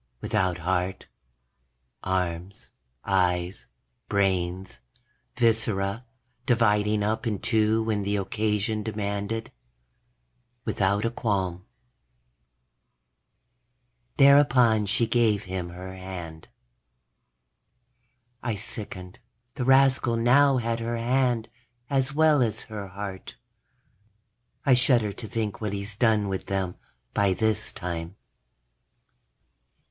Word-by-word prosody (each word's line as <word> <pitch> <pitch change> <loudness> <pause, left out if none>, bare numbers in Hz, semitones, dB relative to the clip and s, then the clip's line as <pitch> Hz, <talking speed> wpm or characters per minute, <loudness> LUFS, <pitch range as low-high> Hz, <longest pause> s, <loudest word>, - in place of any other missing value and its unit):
Without 90 +4 0
heart, 90 +2 -2 1.0
arms, 90 0 -3 0.3
eyes, 90 -1 0 0.4
brains, 95 -6 -1 0.6
viscera, 110 -2 +1 0.4
dividing 105 -3 +2
up 110 +2 -1
in 105 -3 -1
two 110 +2 +2
when 110 -2 -1
the 100 +1 -1
occasion 105 +2 -1
demanded. 105 +1 -3 1.1
Without 100 +2 +1
a 115 - 0
qualm.... 95 -6 -2 2.5
thereupon 125 -6 +5
she 110 +3 +2
gave 110 -3 +2
him 90 -1 -4
her 90 +2 -8
hand. 90 -4 -8 1.9
I 115 -3 -2
sickened. 100 -3 -8 0.3
The 125 - -3
rascal 130 -2 +4
now 135 +4 +4
had 115 -1 -1
her 115 +1 -2
hand, 120 -1 +1 0.4
as 135 0 +1
well 155 -1 +4
as 110 -2 0
her 105 -3 -7
heart. 95 0 -7 1.3
I 135 - +5
shudder 120 -4 +3
to 110 - -7
think 110 -1 -3
what 105 -2 -2
he's 100 +1 -4
done 110 -2 +2
with 95 -1 -4
them, 95 -2 -1 0.4
by 100 -2 +2
this 110 0 0
time. 85 -1 -5
105 Hz, 95 wpm, -26 LUFS, 95-115 Hz, 2.5 s, thereupon